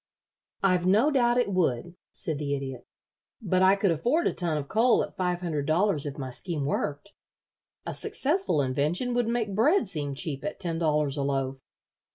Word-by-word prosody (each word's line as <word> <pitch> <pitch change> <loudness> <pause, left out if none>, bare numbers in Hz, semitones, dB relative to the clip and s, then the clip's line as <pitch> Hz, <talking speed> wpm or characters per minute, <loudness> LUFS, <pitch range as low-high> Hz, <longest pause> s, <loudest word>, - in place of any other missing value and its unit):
"I've 180 -2 +2
no 220 +11 +4
doubt 240 -3 +3
it 245 -5 +1
would," 170 -2 0 0.2
said 155 -3 -4
the 145 -1 -1
Idiot; 135 -3 -6 0.5
"but 185 -5 0
I 190 +1 +6
could 195 -2 +1
afford 245 - +1
a - - +1
ton 170 -4 -1
of 140 -2 -4
coal 230 - +3
at - - -8
five 180 -1 -1
hundred 155 -5 -2
dollars 160 -2 +1
if 140 - -6
my 130 -2 -5
scheme 150 +2 -2
worked. 145 +5 -3 0.7
A - - -4
successful 295 - 0
invention 150 - 0
would 240 -1 +1
make 230 -3 -1
bread 250 - +3
seem 145 -6 -3
cheap 140 -1 -4
at 200 - -4
ten 165 -3 -2
dollars 150 -3 +1
a - - 0
loaf. 135 -1 -2
175 Hz, 185 wpm, -27 LUFS, 145-210 Hz, 0.7 s, I